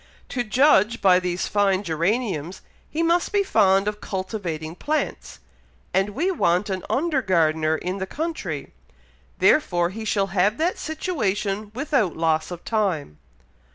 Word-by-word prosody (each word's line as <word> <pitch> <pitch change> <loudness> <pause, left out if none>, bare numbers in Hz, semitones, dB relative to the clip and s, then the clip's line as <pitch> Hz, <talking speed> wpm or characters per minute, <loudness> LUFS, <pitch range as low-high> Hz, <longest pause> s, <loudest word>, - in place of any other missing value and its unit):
"To 245 - -1
judge 235 -2 +3
by 185 -2 +5
these 180 -1 -2
fine 200 -1 +2
geraniums, 175 - -1 0.3
he 325 +2 -1
must 340 +1 +2
be 405 -1 +2
fond 200 - +3
of 210 0 -3
cultivating 185 -5 -4
plants; 305 - -3 0.6
and 195 +2 +1
we 350 +8 +1
want 190 - +1
an 185 -1 -3
under 295 -1 +1
gardener 160 -5 +2
in 185 +4 -4
the 190 - -3
country; 320 - -4 0.6
therefore 175 - +3
he 220 +3 -6
shall 200 -2 0
have 200 +3 +2
that 335 +3 0
situation 215 - -2
without 260 - 0
loss 160 -1 +1
of 175 -1 -8
time." 180 - -1
200 Hz, 140 wpm, -23 LUFS, 180-255 Hz, 0.6 s, by